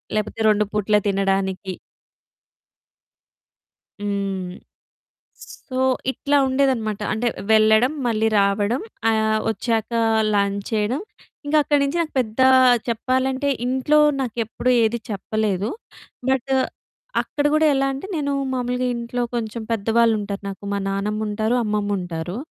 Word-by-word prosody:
లేకపోతే 215 +1 -2
2 210 0 +3
పూట్ల 210 0 +2
తినడానికి. 195 -1 0 2.3
హ్మ్. 195 -2 -2 0.9
స్ - - -7 0.3
సో, 255 - -4 0.3
ఇట్లా 285 +2 0
ఉండేదన్నమాట. 260 -6 0
అంటే 235 +3 0 0.2
వెళ్ళడం, 220 +4 +5
మళ్ళీ 225 -1 +1
రావడం. 200 - +1 0.3
ఆహ్, 220 0 +1
వచ్చాక 225 +1 -1 0.4
లంచ్ 200 0 0
చేయడం. 220 +7 0 0.5
ఇంకా 305 +1 +3
అక్కడి 290 -1 +2
నుంచి 280 +5 0
నాకు 320 - -2
పెద్ద 220 +1 -3 0.5
చెప్పాలంటే 260 +4 0 0.2
ఇంట్లో 265 +4 +2 0.2
నాకేప్పుడు 240 0 -2
ఏది 230 +2 +1
చెప్పలేదు, 210 0 -1 0.6
బట్ 265 0 0 0.7
అక్కడ 290 -1 -3
కూడా 310 0 +4
ఎలా 270 0 +1
అంటే 270 +8 -6
నేను 285 -2 -1 0.2
మామూలుగా 250 0 -1
ఇంట్లో 235 +1 -3
కొంచెం 230 -1 -3
పెద్దవాళ్ళు 225 +1 +2
ఉంటారు 200 0 -5
నాకు, 195 +1 -8
మా 200 - 0
నానమ్ముంటారు 210 +3 -1
అమ్మమ్ముంటారు. 195 -4 -2
220 Hz, 110 wpm, -22 LUFS, 205-255 Hz, 2.3 s, వెళ్ళడం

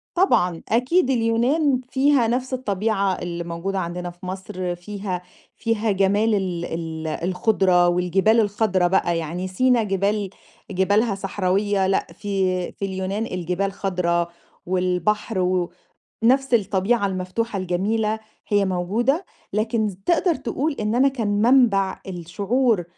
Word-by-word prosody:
طبعًا، 180 - +2
أكيد 255 +7 +2
اليونان 255 +4 +2
فيها 270 -2 +3
نفس 255 +3 -1
الطبيعة 205 -4 0
اللي 170 -1 -4
موجودة 170 +3 -3
عندنا 175 0 -4
في 175 +2 -12
مصر، 185 -1 -4
فيها 190 0 -5 0.3
فيها 225 -2 0
جمال 205 +3 +2
ال 180 -3 -2
ال 160 -1 -5
الخُضرة 180 +2 +2
والجبال 180 +5 +3
الخضرا 205 -4 +2
بقى، 175 -2 +1
يعني 165 +3 -3
سِينا 240 +5 +2
جبال 200 0 0 0.4
جبالها 200 +3 +2
صحراوية، 195 0 0
لأ 190 - +1
في 190 -3 -1
في 200 - -5
اليونان 190 +3 -2
الجبال 180 0 -2
خضرا، 180 -3 0 0.4
والبحر 185 +3 0
و 180 -1 0 0.5
نَفْس 265 +1 +3
الطبيعة 205 +1 +2
المفتوحة 195 +4 -2
الجميلة، 210 +4 0 0.3
هي 205 -1 +3
موجودة، 215 - 0 0.3
لكن 215 +1 0
ز 195 - -7
تقدر 345 0 +3
تقول 280 +4 -2
إن 210 +1 0
أنا 260 +3 +4
كان 245 -6 -2
منْبع 225 -6 +3
الشعور 200 +5 0
195 Hz, 125 wpm, -23 LUFS, 180-225 Hz, 0.5 s, أنا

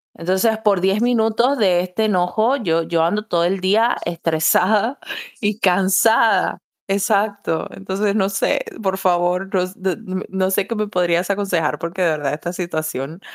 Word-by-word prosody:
Entonces, 190 +6 0
por 200 -4 +3
10 195 +3 +1
minutos 240 +2 +2
de 185 -4 +3
este 185 +4 -2
enojo, 215 +7 +1
yo 165 -8 0
yo 165 0 0
ando 210 +6 0
todo 170 -5 0
el 185 +3 0
día 220 +6 +3
estresada 175 - +1 0.4
y 210 0 -1
cansada 195 +5 +3 0.3
exacto, 200 -3 0
entonces, 200 +1 -2
no 195 -2 +1
sé, 195 - 0 0.2
por 190 -2 -1
favor, 180 0 +1
ros 185 -1 -1
d 190 -1 -1 0.3
no 190 0 0
sé 195 0 +1
qué 230 - -4
me 215 -1 -2
podrías 175 -2 0
aconsejar, 195 -6 0
porque 170 +3 -5
de 175 - +3
verdad 150 -3 -1
esta 165 +3 -4
situación 160 -3 -4
190 Hz, 155 wpm, -20 LUFS, 175-210 Hz, 0.4 s, por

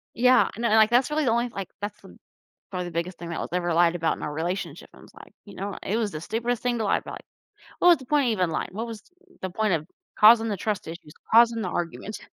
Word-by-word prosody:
Yeah, 250 +2 +4
and 230 - -6
then, 235 - +2
like, 220 0 +6
that's 245 +4 +3
really 305 0 0
the 230 - +2
only, 240 +1 +1
like 195 -5 -6
that's 205 0 -5 0.7
probably 180 -2 -3
the - - -6
biggest 170 +2 -3
thing 170 0 -7
that 170 - -4
was - - -4
ever 175 -2 0
lied 170 0 +4
about 165 -1 0
in - - -11
our 150 - -3
relationship. 170 0 -4
I - - -16
was - - -17
like, - - -15
"You 205 - -13
know, 200 +1 -5
it 210 - -1
was 220 -3 0
the 155 - -5
stupidest 235 +5 -2
thing 245 -1 0
to 220 - -1
lie - - +2
about. - - -9 0.6
What 355 - +4
was 345 - +7
the 260 - -13
point 290 +1 +2
of - - +2
even 180 -6 0
lying? - - -2
What 220 +4 -4
was 225 -2 -8 0.4
the 190 - -3
point 215 0 0
of 155 0 -2 0.3
causing 225 +1 +7
the 205 -3 -2
trust 205 -2 -3
issues, 165 -2 -9 0.2
causing 230 0 +6
the 185 - -2
argument?" 170 - -4
205 Hz, 265 wpm, -25 LUFS, 175-235 Hz, 0.7 s, was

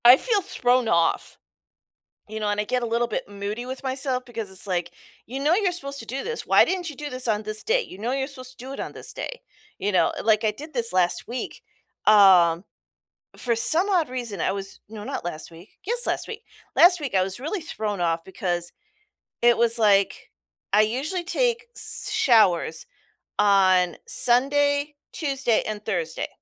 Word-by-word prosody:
I 245 +2 +10
feel 430 - 0
thrown 250 -7 +1
off. 170 -4 +1 0.9
You 220 +1 -6
know, 210 -1 -1
and 205 0 0
I - - -2
get 250 +3 -1
a - - -1
little 235 +1 0
bit 225 - -4
moody 205 +4 -5
with 260 +1 -6
myself 260 -1 -2
because 230 -5 -7
it's 190 +2 -3
like, 175 -2 -2 0.3
"You 260 +4 -6
know 300 +5 +3
you're 390 -2 +1
supposed 280 -5 -5
to 225 - -9
do 265 +4 -4
this. 470 0 -4
Why - - +6
didn't 365 -2 -2
you 295 - -9
do 295 +2 -6
this 255 -2 -4
on 215 -2 +1
this 215 0 -5
day? - - +2
You 185 - -10
know 225 +5 -3
you're 270 0 -1
supposed 255 -3 -8
to - - -23
do 265 - -7
it - - -8
on - - -4
this - - -6
day." - - -6 0.4
You 205 - -1
know, 185 - +3
it - - -6
like, 220 0 +3
"I 215 - +2
did 300 +8 -10
this 235 -4 0
last 180 -1 +1
week." 245 +1 -6 0.4
Um, 185 -4 +6 0.7
for 235 -2 0
some 315 - +4
odd 350 -8 +2
reason, 235 -8 -4
I - - +1
was 195 0 -6
no, 215 -1 -8
not - - -4
last 165 -3 -5
week 170 +4 -16
yes, 480 +4 +1
last - - -1
week. 450 0 -8 0.3
Last 355 +1 +7
week, 275 -9 -4
I 185 - +4
was 190 +4 -4
really 320 +8 -3
thrown 215 - -4
off, 165 -1 0
because 175 -2 -3 0.7
it 240 0 +5
was, 235 0 +3
like 200 -3 +2 0.4
I 210 - +5
usually 280 - -2
take 475 +4 0
s - - +2
showers 220 - +3 0.5
on 185 -4 +4
Sunday, 285 +4 +2 0.2
Tuesday, 275 -6 0
and 210 -1 -5
Thursday, 170 -6 -2
235 Hz, 200 wpm, -24 LUFS, 200-285 Hz, 0.9 s, I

